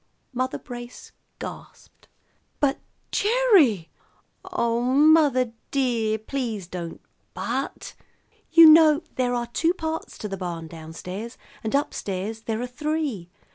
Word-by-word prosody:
Mother 255 +1 -1
Brace 240 -1 -10 0.3
gasped. - - -10 0.5
"But 280 -1 +1 0.3
Gerry 400 - +3 0.3
" - - -42
"Oh, 235 -9 0
mother 275 -1 +4 0.2
dear, 235 -5 0
please 220 -3 -4
don't 170 -2 -6 0.4
'but.' - - -4 0.6
You 330 -1 +9
know 310 0 +7
there 250 -1 0
are 240 0 -1
two 325 +9 0
parts 320 -2 -4
to 210 - -5
the 195 -1 -5
barn 170 -3 -5
down 160 0 -10
stairs, 200 +8 -7 0.3
and 220 +4 -1
up 285 - 0
stairs 205 +3 -4
there 220 -1 -2
are - - -1
three. 280 - -3
245 Hz, 130 wpm, -24 LUFS, 210-300 Hz, 0.6 s, You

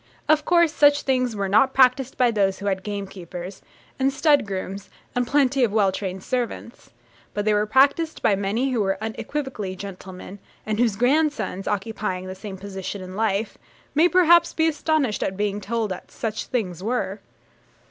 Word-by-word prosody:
Of 305 0 +3
course, 340 -2 +4
such 290 -1 +4
things 255 -3 0
were 200 -1 -1
not 220 +7 +3
practised 260 0 +3
by 245 -2 +3
those 195 -3 +1
who 200 - -8
had 190 -2 0
gamekeepers, 190 -2 -7 0.4
and 270 +1 +2
stud 290 -3 +3
grooms, 195 0 -5 0.2
and 245 -1 0
plenty 275 -1 +2
of 230 - +2
well 205 -3 +3
trained 190 -1 -5
servants; 245 -2 -4 0.5
but 205 0 -1
they 215 - +3
were 210 0 +1
practised 280 +7 +2
by 205 - +4
many 210 +7 -1
who 240 -4 +1
were 195 -1 0
unequivocally 220 -2 -4
gentlemen, 190 0 -9 0.3
and 215 0 -2
whose 235 -4 +2
grandsons, 270 -5 0
occupying 195 -3 -2
the 185 - -6
same 190 0 -8
position 195 0 -6
in 185 0 -9
life, 215 0 -1 0.3
may 325 +4 +4
perhaps 345 -2 +5
be 320 0 +3
astonished 305 -7 0
at 190 - -2
being 205 0 -1
told 220 0 -2
that 185 - -7
'such 220 -1 -4
things 185 -9 -3
were.' 205 -2 -2
215 Hz, 170 wpm, -23 LUFS, 195-265 Hz, 0.5 s, perhaps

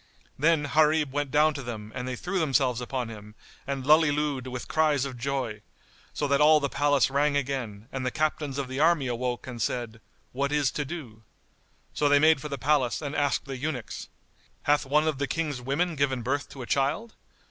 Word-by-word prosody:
Then 160 +1 +3
Gharib 155 -1 +3
went 145 0 -1
down 150 +3 +4
to 140 - -5
them 110 -4 -7
and 125 -1 -4
they 130 - -3
threw 185 +8 -2
themselves 135 -5 +1
upon 125 -1 -3
him 105 -1 -11 0.3
and 135 -2 -3
lullilooed 150 -3 +3
with 125 -1 -6
cries 150 -4 +2
of 135 -2 -5
joy, 120 -4 -3 0.5
so 145 - -2
that 140 +1 +2
all 155 +1 +7
the 140 -1 -1
palace 145 -2 +2
rang 145 +1 +2
again 125 -6 -3
and 135 -1 -4
the 125 - 0
Captains 150 -1 -1
of 140 -2 -2
the 130 +1 -4
army 160 -2 +4
awoke 125 0 -2
and 120 -3 -7
said, 115 0 -3 0.3
"What 140 +2 -1
is 145 -3 +2
to 150 - -3
do?" 135 -9 -8 0.7
So 145 - +2
they 145 - +6
made 155 -1 +5
for 150 - -5
the 140 - -3
palace 135 -4 +1
and 145 -2 -5
asked 145 -1 +1
the 135 -1 -5
eunuchs, 130 -5 -5 0.5
"Hath 145 -1 +2
one 150 +3 +3
of 150 -4 -1
the 140 - 0
King's 150 -6 -2
women 155 +7 -1
given 135 -4 0
birth 140 +4 -1
to 135 - -8
a - - -6
child?" 145 - 0
140 Hz, 200 wpm, -27 LUFS, 125-150 Hz, 0.7 s, all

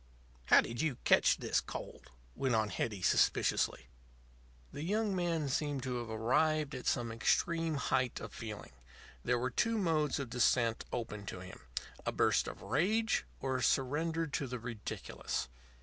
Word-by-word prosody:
"How - - +7
did 115 +1 -4
you 150 -6 0
catch - - +5
this - - +1
cold?" - - -8 0.2
went 130 -3 0
on 110 -1 +2
Hetty, 100 0 -3
suspiciously. 90 - +2 0.9
The - - -5
young 205 +4 0
man 170 -4 0
seemed 140 0 -1
to 125 -2 -2
have 120 -1 -5
arrived 140 +7 +1
at 130 - -5
some 120 -2 +1
extreme 165 +8 +1
height 130 -2 0
of - - -8
feeling. 110 -3 -7 0.5
There 125 - +2
were 125 +1 -1
two 230 - +1
modes 160 -7 +1
of 135 -4 -5
descent 120 -1 +2
open 105 -4 -4
to 90 - -5
him 90 - -10 0.4
a - - -1
burst - - +2
of - - -7
rage 220 +7 +1 0.2
or 130 -1 0
a - - -3
surrender 160 +5 +1
to 145 -2 -2
the 125 0 -4
ridiculous. 115 - -4
130 Hz, 160 wpm, -34 LUFS, 115-160 Hz, 0.9 s, How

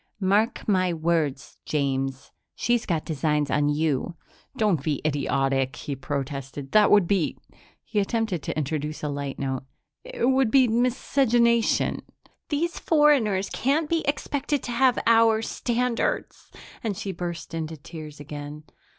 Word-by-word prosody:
Mark 205 +4 +1
my 185 -3 +2
words, 160 -4 -1
James, 135 -2 -2 0.2
she's 240 -1 0
got 165 -4 -1
designs 150 -2 0
on 145 0 +2
you." 150 +2 0 0.4
"Don't 205 - +2
be 145 -1 -1
idiotic," 135 -3 0
he 140 - -5
protested. 135 0 -5
"That 210 -1 +5
would 205 -3 +6
be 190 -5 0 0.2
" - - -30
he 210 - -1
attempted 210 -4 -1
to - - -4
introduce 150 +1 -3
a 150 - -1
light 140 -1 -4
note 130 -2 -2 0.4
"it - - -2
would 260 -3 +3
be 260 +1 +5
miscegenation." 235 0 +2 0.5
"These 330 +4 -1
foreigners 270 - +3
can't 295 +5 +1
be 330 +1 0
expected 285 0 -1
to 240 - -4
have 250 +1 +3
our 225 -1 +5
standards." 245 - -2 0.3
And 210 -5 -2
she 200 -2 -4
burst 170 -3 -6
into 160 -1 -4
tears 150 0 -10
again. 145 +1 -8
175 Hz, 140 wpm, -25 LUFS, 145-235 Hz, 0.5 s, would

